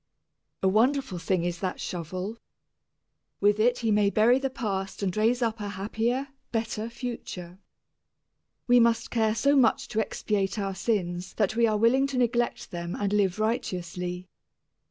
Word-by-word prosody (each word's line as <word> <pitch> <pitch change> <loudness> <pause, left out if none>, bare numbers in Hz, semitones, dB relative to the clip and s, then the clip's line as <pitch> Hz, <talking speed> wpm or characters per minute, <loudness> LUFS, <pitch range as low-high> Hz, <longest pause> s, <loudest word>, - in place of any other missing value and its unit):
A - - +4
wonderful 235 0 +2
thing 180 0 0
is 175 -1 -2
that 185 -1 -3
shovel. 185 +6 -5 1.0
With 205 +1 +3
it 245 +3 +3
he 220 - +3
may 205 -1 +4
bury 230 +5 +4
the 270 0 -1
past 200 -6 -3
and 185 -3 -1
raise 230 +3 +2
up 225 -1 -1
a 205 -1 -4
happier, 225 +7 -2 0.2
better 225 -1 -2
future. 210 -7 -7 1.1
We 245 0 +6
must 230 -1 +2
care 220 -2 +2
so 280 +4 +3
much 245 -5 +3
to 215 - -1
expiate 200 -2 -1
our 195 -2 -2
sins 185 -4 -2
that 215 0 +1
we 230 0 +4
are 215 -1 +1
willing 250 +5 +4
to 275 -2 -4
neglect 240 -1 0
them 170 0 -4
and 200 0 -1
live 195 -2 +2
righteously. 180 -5 -2
215 Hz, 155 wpm, -27 LUFS, 190-235 Hz, 1.1 s, We